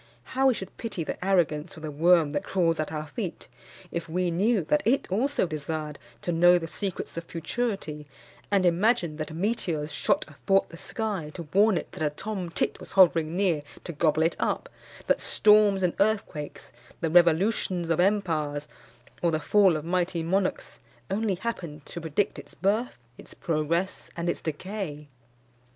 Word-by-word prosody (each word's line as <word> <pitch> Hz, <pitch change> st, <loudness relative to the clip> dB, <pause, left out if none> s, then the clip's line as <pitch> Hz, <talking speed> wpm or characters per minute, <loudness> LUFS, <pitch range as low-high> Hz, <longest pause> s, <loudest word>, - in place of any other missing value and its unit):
How 265 Hz, +1 st, +3 dB
we 260 Hz, -, +4 dB
should 190 Hz, -3 st, -7 dB
pity 220 Hz, -7 st, -4 dB
the 160 Hz, -, -5 dB
arrogance 175 Hz, -3 st, +1 dB
of 160 Hz, -, -11 dB
the 155 Hz, -, -4 dB
worm 165 Hz, 0 st, +4 dB
that -, -, -2 dB
crawls 165 Hz, -4 st, +1 dB
at 155 Hz, -, -2 dB
our 155 Hz, -1 st, -3 dB
feet, 145 Hz, -4 st, -6 dB, 0.4 s
if 170 Hz, -1 st, -4 dB
we 180 Hz, +1 st, 0 dB
knew 200 Hz, +3 st, +2 dB
that 150 Hz, -1 st, +2 dB
it 255 Hz, +5 st, +2 dB
also 255 Hz, +5 st, +1 dB
desired 155 Hz, -1 st, -4 dB, 0.2 s
to 175 Hz, -, -1 dB
know 175 Hz, +1 st, +6 dB
the 165 Hz, -2 st, -4 dB
secrets 190 Hz, -2 st, -5 dB
of 170 Hz, -, -3 dB
futurity, 165 Hz, -4 st, -3 dB, 0.4 s
and 195 Hz, -2 st, +3 dB
imagined 175 Hz, -2 st, +2 dB
that 155 Hz, +1 st, -4 dB
meteors 165 Hz, -4 st, -1 dB
shot -, -, +1 dB
athwart 195 Hz, +6 st, +1 dB
the -, -, -10 dB
sky 200 Hz, -6 st, -3 dB
to 170 Hz, -, -5 dB
warn 205 Hz, 0 st, +5 dB
it -, -, -5 dB
that -, -, -9 dB
a 155 Hz, -, +2 dB
tom 185 Hz, +3 st, -5 dB
tit -, -, -1 dB
was -, -, -10 dB
hovering 170 Hz, -4 st, +5 dB
near 180 Hz, -6 st, +2 dB, 0.2 s
to 170 Hz, -, -6 dB
gobble 155 Hz, 0 st, +2 dB
it 165 Hz, -, +1 dB
up; -, -, -1 dB, 0.4 s
that -, -, +2 dB
storms 210 Hz, -2 st, +4 dB
and 180 Hz, -, +2 dB
earthquakes, 200 Hz, -8 st, -1 dB, 0.3 s
the 165 Hz, -, -1 dB
revolutions 175 Hz, 0 st, +3 dB
of 165 Hz, -, +1 dB
empires, 160 Hz, -7 st, +1 dB, 0.5 s
or 170 Hz, -, +3 dB
the 155 Hz, -1 st, 0 dB
fall 190 Hz, 0 st, +4 dB
of 155 Hz, -, -7 dB
mighty 175 Hz, -1 st, 0 dB
monarchs, 185 Hz, +3 st, -1 dB, 0.3 s
only 205 Hz, -1 st, 0 dB
happened 175 Hz, -7 st, -5 dB
to 170 Hz, -, -7 dB
predict 160 Hz, +5 st, -1 dB
its -, -, -13 dB
birth, 215 Hz, +6 st, 0 dB, 0.2 s
its -, -, -12 dB
progress, 165 Hz, +3 st, -1 dB
and 170 Hz, +1 st, -1 dB
its -, -, -2 dB
decay! 160 Hz, -2 st, -5 dB
175 Hz, 170 wpm, -27 LUFS, 155-195 Hz, 0.5 s, know